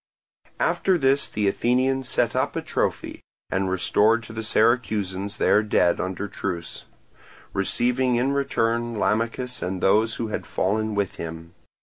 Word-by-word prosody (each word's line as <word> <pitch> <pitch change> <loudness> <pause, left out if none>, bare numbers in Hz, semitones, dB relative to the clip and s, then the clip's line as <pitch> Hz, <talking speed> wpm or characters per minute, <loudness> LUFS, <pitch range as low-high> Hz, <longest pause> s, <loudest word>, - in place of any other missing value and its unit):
After 190 -2 +2
this 135 -2 +2
the 105 -1 -1
Athenians 130 +5 +1
set - - +1
up - - 0
a - - -1
trophy - - -2 0.3
and 95 0 0
restored 105 +5 +2
to 110 - -10
the 110 - -4
Syracusans 110 -4 0
their 105 - +4
dead 90 -5 +2
under 95 +2 -3
truce, 90 -4 -5 0.7
receiving 125 +5 +1
in 125 +3 +1
return 120 -4 0
Lamachus 115 +4 -1
and 95 +1 -3
those 110 +5 +3
who 115 0 -3
had - - -4
fallen 110 +2 -1
with 100 -3 -1
him. 80 +1 -7
110 Hz, 140 wpm, -24 LUFS, 95-120 Hz, 0.7 s, their